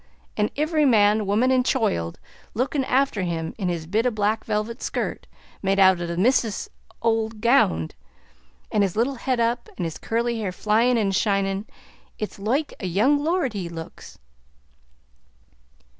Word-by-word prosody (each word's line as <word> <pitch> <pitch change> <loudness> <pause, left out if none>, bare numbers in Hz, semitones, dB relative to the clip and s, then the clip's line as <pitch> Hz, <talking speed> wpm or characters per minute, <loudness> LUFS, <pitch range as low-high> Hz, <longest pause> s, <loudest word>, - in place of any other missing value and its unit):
An' 210 0 +1
ivvery 305 0 +2
man, 210 -2 +4
woman, 225 +6 +2
and 255 -1 +3
choild 85 - 0 0.4
lookin' 270 +4 0
afther 260 -6 +1
him 165 -2 -3
in 185 -3 -1
his 170 -2 -3
bit 215 +8 +1
of 245 - 0
a - - -11
black 215 +1 0
velvet 220 +3 -2
skirt - - -3 0.3
made 195 0 +1
out 190 -2 +5
of 170 - -3
the 170 0 -4
misthress's 225 +1 +1 0.3
ould 225 -1 0
gownd; 210 - +3 0.8
an' 210 - +2
his 195 -3 0
little 240 +5 +1
head 255 0 -2
up, 235 +1 0
an' 180 - -3
his 165 -2 -4
curly 235 0 -1
hair 200 -4 -2
flyin' 225 +6 +2
an' 205 -3 +1
shinin'. 195 0 0 0.5
It's 210 -1 -5
loike 260 +9 -1
a 190 - -3
young 255 - +2
lord 325 -6 0
he 185 -4 -4
looks." 165 -1 -9
215 Hz, 160 wpm, -24 LUFS, 195-245 Hz, 0.8 s, out